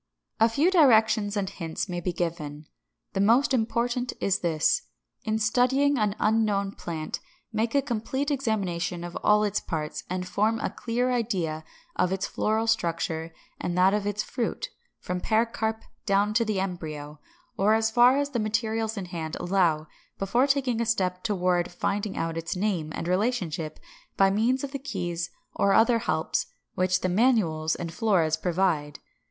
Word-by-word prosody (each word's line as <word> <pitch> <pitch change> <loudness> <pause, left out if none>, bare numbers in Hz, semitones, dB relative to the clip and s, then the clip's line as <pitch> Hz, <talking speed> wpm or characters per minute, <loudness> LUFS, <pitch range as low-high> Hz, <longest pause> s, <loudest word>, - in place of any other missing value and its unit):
= - - -58
A 225 - +5
few 290 +10 +2
directions 220 - +4
and 195 -1 0
hints 170 -1 -4
may 175 -2 -3
be 180 - -1
given. 160 -4 -4 0.5
The - - -1
most 235 +7 +4
important 245 +1 0
is 195 -1 +1
this: 170 - +2 0.4
In 220 -1 +1
studying 255 +5 +2
an 210 -1 +1
unknown 210 -2 +1
plant, 160 -5 -5 0.3
make 225 +4 0
a 280 - +4
complete 265 +3 -2
examination 190 -10 -1
of 175 0 -7
all 210 0 +3
its 205 -1 0
parts, 155 -2 -4
and 180 0 -3
form 215 +5 +1
a - - -2
clear 245 +2 -1
idea 185 -10 -1 0.3
of 180 0 +1
its 190 0 -1
floral 220 +1 0
structure 165 -6 -1 0.3
and 175 0 -2
that 185 +2 +5
of 210 -1 0
its 205 +1 -1
fruit, 255 - -3 0.3
from 180 0 -3
pericarp 220 0 0 0.2
down 200 +1 +2
to 230 +2 +3
the 215 -4 -1
embryo, 155 -6 -5 0.4
or 210 +3 +3
as 220 0 +1
far 245 +3 +6
as 285 0 -1
the 240 - -1
materials 220 +1 -1
in 195 - -3
hand 165 -3 -5
allow, 175 -4 +1 0.3
before 235 +8 +2
taking 265 -4 +1
a - - +1
step 185 -5 0
toward 180 -5 +1
finding 200 +3 -2
out 165 0 -2
its 165 +2 -4
name 180 -5 -1
and 165 - -4
relationship 180 -6 -1 0.4
by 195 0 +5
means 235 +6 +1
of 280 - -4
the 275 - -4
keys 175 -10 -3 0.2
or 200 0 +2
other 230 +1 +5
helps 160 -6 -1 0.3
which 185 0 +1
the - - +1
Manuals 180 -8 +2
and 170 -1 -5
Floras 170 -7 +2
provide. 165 -3 0
200 Hz, 165 wpm, -27 LUFS, 175-230 Hz, 0.5 s, far